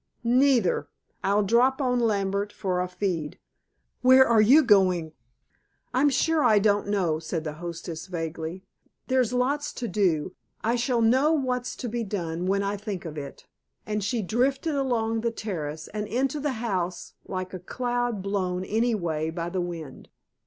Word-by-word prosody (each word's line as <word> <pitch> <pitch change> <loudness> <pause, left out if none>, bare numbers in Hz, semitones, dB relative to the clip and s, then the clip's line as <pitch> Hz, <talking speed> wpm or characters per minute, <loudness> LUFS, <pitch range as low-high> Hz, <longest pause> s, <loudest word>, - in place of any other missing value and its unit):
"Neither. 245 -4 +3 0.4
I'll 205 +2 +2
drop 245 +6 +3
on 250 -3 +1
Lambert 200 -2 0
for 185 -4 -2
a 180 - -1
feed. 180 -5 -3 0.6
Where 260 +1 +7
are 230 -2 +5
you 270 +9 +7
going?" 185 - +3 0.8
"I'm 275 +3 +4
sure 315 +2 +2
I 220 -4 +5
don't 205 0 +2
know," 180 -6 +1
said 160 0 -4
the 155 -2 -4
hostess 170 0 -6
vaguely. 165 0 -5 0.5
"There's 255 -3 +2
lots 280 +4 0
to 240 - -4
do. 185 -6 0 0.3
I 230 +2 +2
shall 240 -1 +1
know 260 +7 +4
what's 255 -4 -1
to 245 - -5
be 235 +1 -2
done, 180 -4 -3
when 200 +1 +1
I 200 +1 -1
think 200 -4 -5
of 160 -2 -6
it," 140 -2 -8 0.4
and 210 -1 -2
she 220 +2 -1
drifted 265 - 0
along 230 -5 0
the 235 - +1
terrace 160 -9 -5
and 210 0 -4
into 265 +6 -1
the 290 -1 -1
house 185 -7 -3
like 185 -1 -4
a 185 - -5
cloud 245 +1 -2
blown 185 -2 -1
any 225 +3 +1
way 160 -5 -2
by 165 +1 -4
the 185 - -1
wind. 165 -6 -7
205 Hz, 165 wpm, -26 LUFS, 180-245 Hz, 0.8 s, Where